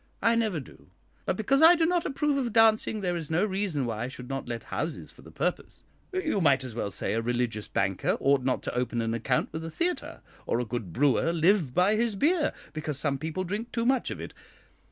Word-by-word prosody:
"I 230 +2 +5
never 220 -7 +1
do; 135 - -14 0.4
but - - 0
because 270 +6 +2
I 330 +2 +9
do 330 -1 +2
not 350 0 +1
approve 290 +1 0
of 255 -4 -1
dancing, 220 -1 +4
there 180 -2 -1
is 165 -4 -4
no 170 +6 +2
reason 190 -9 -1
why 115 0 -3
I - - -3
should 125 -1 -9
not 135 -1 -4
let 115 -2 -4
houses 160 0 -3
for - - -18
the - - -13
purpose. - - -3 0.3
You 325 - 0
might 135 -5 +4
as 125 -3 -6
well 110 -3 -2
say - - -2
a 115 - 0
religious 120 -2 -1
banker 95 -1 0
ought 140 -1 +3
not 130 0 0
to - - -3
open 125 -1 -1
an 115 0 -1
account 120 +2 0
with 160 - -4
a 165 - -5
theatre, 345 - -2 0.3
or 115 - +1
a 125 - -1
good 110 -5 -4
brewer 145 - +2
live 170 -4 +2
by 195 +4 +4
his 230 -2 +1
beer, 310 - +2 0.2
because 155 -2 -3
some 140 -2 -1
people 160 +5 -3
drink 205 +6 -4
too 230 -1 -1
much 260 0 +2
of - - -5
it. - - -7
160 Hz, 230 wpm, -28 LUFS, -, 0.4 s, I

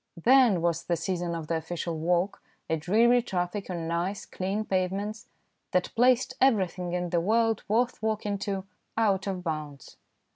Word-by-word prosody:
Then 235 -2 +5
was 170 -1 +1
the 175 - +1
season 175 -2 -2
of 165 -2 -5
the 165 +1 -1
official 165 +1 -4
walk, 175 +4 0 0.3
a 160 - +1
dreary 225 +10 +4
traffic 190 -2 -3
on 170 -3 -3
nice, 175 +4 -2
clean 195 +3 -3
pavements, 195 +3 -2 0.5
that 180 - +1
placed 255 +2 +3
everything 185 -8 +2
in 180 -1 -2
the 170 -2 +2
world 225 +3 +2
worth 240 +4 +1
walking 210 -2 -1
to 195 -1 -3 0.3
out 200 -3 +2
of 185 -2 -3
bounds. 155 -4 -5
190 Hz, 155 wpm, -28 LUFS, 170-215 Hz, 0.5 s, Then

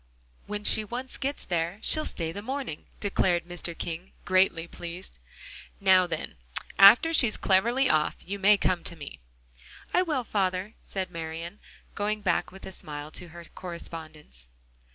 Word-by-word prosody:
when 210 0 -4
she 215 - +4
once 245 +5 -6
gets 280 +1 -3
there, 170 +1 -1
she'll 310 -1 +4
stay 165 -2 -2
the 200 - -6
morning," 260 - -4
declared 180 -4 +1
Mr. 175 -1 -5
King, 170 +2 -5
greatly 185 -3 +3
pleased. 175 +2 -8 0.6
"Now, 190 -2 +5
then, 165 -2 -5 0.4
after 225 +12 +9
she's 240 -8 +3
cleverly 235 +8 +3
off, 155 -5 +2
you 200 +2 -4
may 205 +1 +6
come 180 -3 +1
to 170 - -2
me." 145 -3 -9 0.7
"I 360 - +5
will, 305 -8 0
father," 195 -1 -1
said 190 -2 -5
Marian, 165 +3 -6 0.3
going 210 +1 -1
back 180 -4 0
with 190 +1 -11
a - - -6
smile 150 -3 -7
to 180 - -5
her 170 +1 -11
correspondence. 155 - -7
185 Hz, 155 wpm, -28 LUFS, 170-210 Hz, 0.7 s, after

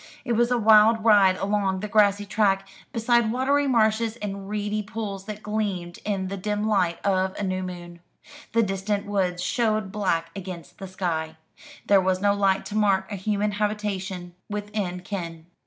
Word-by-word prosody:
It - - -2
was 235 +1 +3
a 250 - +2
wild 220 0 +5
ride 200 -4 +6
along 195 -1 0
the 210 - -3
grassy 205 -1 +3
track, 195 -1 +1 0.2
beside 235 -1 +2
watery 280 +3 +1
marshes 225 -2 +2
and 200 -3 -6
reedy 210 0 -2
pools 205 -2 -5
that 210 0 -7
gleamed 200 -5 -3
in 195 -3 -2
the 195 +1 -4
dim 210 +2 -2
light 180 -6 +1
of 190 -1 +1
a - - -3
new 185 -1 -1
moon. 175 -2 -7 0.5
The 230 0 +4
distant 200 +1 -2
woods 185 -3 -1
showed 215 0 0
black 170 -5 -1
against 180 -2 -8
the 195 - -6
sky. 160 -4 -3 0.5
There 200 -1 +5
was 185 0 +1
no 200 +1 +3
light 195 -1 +1
to 210 - -6
mark 200 -2 +2
a - - -2
human 205 +2 -1
habitation 200 -4 -3 0.2
within 205 -3 -3
ken. 170 -4 -6
200 Hz, 170 wpm, -25 LUFS, 185-215 Hz, 0.5 s, ride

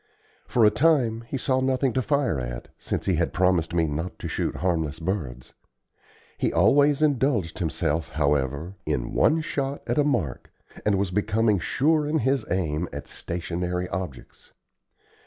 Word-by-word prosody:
For 115 -3 +4
a 105 - +6
time 125 -7 +2
he 135 - -3
saw 130 +1 +1
nothing 130 -1 +1
to 130 - +1
fire 140 - +1
at, - - -6
since - - -3
he 95 -4 +1
had 85 - 0
promised 90 -3 +2
me 85 -1 +2
not 80 +5 -4
to - - -5
shoot - - -2
harmless 80 -4 -1
birds. 80 -9 -4 0.9
He - - +1
always 140 - +4
indulged 130 - +1
himself, 80 -2 -1
however, 70 +3 0
in - - -1
one 160 +1 +3
shot 140 -3 -3
at - - 0
a - - +5
mark, 120 - -1 0.4
and 100 -2 +3
was 95 -2 -1
becoming 105 +1 +2
sure 150 - +1
in 155 +2 +1
his 135 -2 +1
aim 85 -2 -1
at - - -7
stationary 90 +1 -3
objects. 90 -9 -7
95 Hz, 155 wpm, -25 LUFS, 80-130 Hz, 0.9 s, a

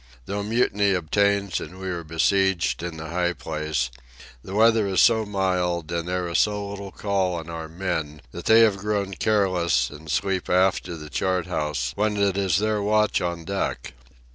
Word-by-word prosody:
Though 100 +6 -3
mutiny 105 -2 +1
obtains 100 +2 +1
and 95 - -9
we 95 - -5
are 85 -2 -3
besieged 90 +3 +1
in 85 -2 -5
the 80 0 -7
high 90 +1 0
place, 75 -7 -3 0.5
the 95 - -7
weather 110 -1 +4
is 95 -1 +1
so 110 -2 +4
mild 90 -4 -1
and 85 0 -2
there 90 0 -1
is 85 - +1
so 105 -1 +1
little 100 -1 -7
call 95 -3 -1
on 85 0 -6
our 80 -1 -6
men 80 -4 -3
that - - -8
they 110 +1 +7
have 110 -3 +4
grown 100 -1 -2
careless 95 -5 +1
and 75 +2 -11
sleep 95 +3 -1
aft 90 0 +2
of 85 -3 -6
the 75 -1 -10
chart 90 +5 0
house 75 -8 -2
when 105 +2 0
it 100 -2 +2
is 95 -2 +1
their 105 0 0
watch 105 +1 +2
on 85 -2 -3
deck. 100 0 -3
95 Hz, 185 wpm, -24 LUFS, 85-100 Hz, 0.5 s, they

